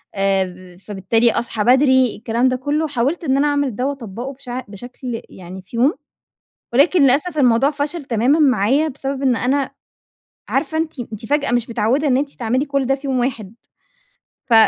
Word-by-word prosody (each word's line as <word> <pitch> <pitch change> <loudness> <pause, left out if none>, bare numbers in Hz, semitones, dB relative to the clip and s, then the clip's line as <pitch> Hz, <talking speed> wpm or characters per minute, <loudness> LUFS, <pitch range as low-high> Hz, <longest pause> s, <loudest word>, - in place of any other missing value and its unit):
آآ، 185 -2 -1
فبالتالي 210 +4 +1
أصحى 230 -2 -2
بدري، 260 0 +4
الكلام 235 +3 0
ده 255 - 0
كله، 290 +5 -1
حاولت 285 +5 -1
إن 270 -3 +1
أنا 285 +2 +2
أعمل 285 -5 0
ده 250 - -2
وأطبقه 255 -2 -5
بشع 255 -1 -6
بشكل 245 +3 -7
يعني 185 +1 -10
في 185 +5 -13
يوم، 260 +6 +3 0.8
ولكن 310 +7 +4
للأسف 290 +5 +2
الموضوع 260 0 +4
فشل 290 +2 -3
تمامًا 250 +6 +2
معايا، 270 +1 +3
بسبب 275 -1 -4
إن 260 -3 +2
أنا 265 +3 0 0.8
عارفة 315 - -1
أنتِ 320 -4 -3
أنتِ 225 -2 -7
فجأة 290 +1 0
مش 240 -1 0
متعودة 235 +6 +1
إن 255 - +3
أنتِ 280 +1 -1
تعملي 250 +3 -1
كل 280 -2 -1
ده 270 - +2
في 275 +1 -8
يوم 265 -1 0
واحد، 230 -5 -3 1.0
ف - - +5
255 Hz, 170 wpm, -19 LUFS, 230-280 Hz, 1.0 s, ف